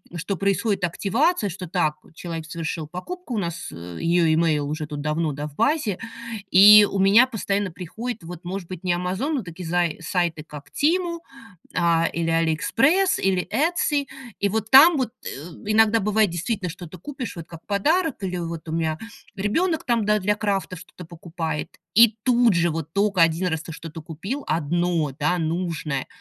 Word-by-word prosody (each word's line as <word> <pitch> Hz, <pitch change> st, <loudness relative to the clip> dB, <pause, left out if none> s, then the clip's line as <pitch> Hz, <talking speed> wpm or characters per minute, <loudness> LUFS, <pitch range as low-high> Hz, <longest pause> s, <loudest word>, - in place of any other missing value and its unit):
что 180 Hz, +4 st, -3 dB
происходит 200 Hz, 0 st, 0 dB
активация, 205 Hz, -, +1 dB
что 180 Hz, 0 st, -7 dB
так, 160 Hz, -4 st, 0 dB, 0.2 s
человек 165 Hz, -1 st, -6 dB
совершил 165 Hz, -1 st, -4 dB
покупку, 255 Hz, -, -6 dB
у -, -, -1 dB
нас, 170 Hz, -3 st, -4 dB
э, 85 Hz, 0 st, -9 dB
её 170 Hz, -1 st, +3 dB
имейл 155 Hz, -3 st, +1 dB
уже 155 Hz, 0 st, -3 dB
тут 150 Hz, -2 st, -6 dB
давно, 150 Hz, +1 st, -1 dB
да, 145 Hz, +2 st, -5 dB
в 145 Hz, -, -14 dB
базе. 280 Hz, -, +1 dB, 0.5 s
И 205 Hz, +2 st, +9 dB
у 195 Hz, -, -2 dB
меня 205 Hz, +6 st, +6 dB
постоянно 205 Hz, -4 st, -2 dB
приходит 215 Hz, +6 st, -6 dB
вот, 175 Hz, +1 st, -9 dB
может 185 Hz, -1 st, -5 dB
быть, 185 Hz, -1 st, -8 dB
не 180 Hz, -1 st, +1 dB
"Амазон", 190 Hz, -, -2 dB
но 250 Hz, -, -2 dB
такие 170 Hz, 0 st, -8 dB
зае 175 Hz, -1 st, 0 dB
сайты, 170 Hz, -3 st, -1 dB
как 150 Hz, -2 st, -11 dB
Temu, 340 Hz, +2 st, 0 dB, 0.6 s
а, 165 Hz, -1 st, +2 dB
или 165 Hz, 0 st, -1 dB
AliExpress, 230 Hz, -, +2 dB
или 185 Hz, -2 st, +1 dB
Etsy. 295 Hz, -2 st, +1 dB, 0.3 s
И 200 Hz, -, +1 dB
вот 220 Hz, +1 st, -2 dB
там 295 Hz, +4 st, +9 dB
вот, 255 Hz, -4 st, -1 dB
э, -, -, -4 dB, 0.4 s
иногда 220 Hz, +1 st, +4 dB
бывает 210 Hz, 0 st, +2 dB
действительно 180 Hz, +3 st, -3 dB
что-то 175 Hz, +1 st, -9 dB
купишь 260 Hz, -, -6 dB
вот 165 Hz, -1 st, -8 dB
как 165 Hz, -1 st, -12 dB
подарок, 295 Hz, -, 0 dB
или 180 Hz, -1 st, -2 dB
вот 165 Hz, -1 st, -5 dB
у -, -, -4 dB
меня 160 Hz, -1 st, -1 dB, 0.4 s
ребёнок 320 Hz, -, 0 dB
там, 230 Hz, -4 st, +1 dB
да, 210 Hz, 0 st, +2 dB
для 205 Hz, +2 st, +1 dB
крафта 200 Hz, -3 st, -2 dB
что-то 180 Hz, 0 st, -12 dB
покупает. 165 Hz, -2 st, -6 dB, 0.2 s
И 225 Hz, 0 st, +7 dB
тут 240 Hz, -4 st, +4 dB
же, 170 Hz, 0 st, +2 dB
вот 160 Hz, 0 st, -5 dB
только 200 Hz, -2 st, +2 dB
1 165 Hz, +2 st, +3 dB
раз 160 Hz, -2 st, -2 dB
ты -, -, -8 dB
что-то 160 Hz, 0 st, -8 dB
купил 185 Hz, -, -5 dB
одно, 165 Hz, 0 st, 0 dB
да, 180 Hz, 0 st, +1 dB
нужное, 160 Hz, -4 st, -2 dB
180 Hz, 175 wpm, -23 LUFS, 165-215 Hz, 0.6 s, И